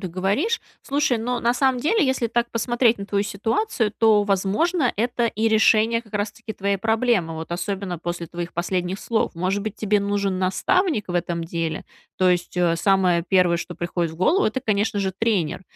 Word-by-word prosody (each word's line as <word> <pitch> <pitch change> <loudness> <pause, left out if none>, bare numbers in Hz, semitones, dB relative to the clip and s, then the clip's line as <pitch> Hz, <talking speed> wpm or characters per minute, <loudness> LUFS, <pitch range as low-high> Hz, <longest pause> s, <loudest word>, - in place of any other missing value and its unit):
ты 185 - -4
говоришь. 200 - 0 0.2
Слушай, 280 -4 0
но 245 +2 -2
на 235 +1 +2
самом 260 -1 +1
деле, 360 - +2
если 260 -3 0
так 240 +1 -1
посмотреть 235 0 +1
на 200 - -6
твою 200 -1 0
ситуацию, 225 - -1
то, 220 -2 +4
возможно, 230 - +1
это 240 +1 0
и 225 0 0
решение 220 +1 +3
как 215 -2 -17
раз-таки 205 +1 -4
твоей 200 0 -1
проблемы. 225 -6 +1
Вот 160 +1 -7
особенно 190 -1 -3
после 175 0 -4
твоих 170 +1 -6
последних 180 +2 -2
слов. 225 -6 -1
Может 185 +4 -1
быть, 215 -1 -4
тебе 210 -1 +1
нужен 200 -2 -1
наставник 210 - +1
в 175 - -4
этом 170 -1 -1
деле? 165 -1 -3 0.3
То 185 -1 +4
есть, 180 0 -1
э, 170 -2 +2
самое 180 -3 +2
первое, 180 -3 +3
что 175 +1 -6
приходит 170 -1 -2
в - - -11
голову, 330 - +2
это, 240 +4 0
конечно 205 -1 0
же, 190 -1 -1
тренер. 195 -7 0
205 Hz, 185 wpm, -23 LUFS, 180-230 Hz, 0.3 s, то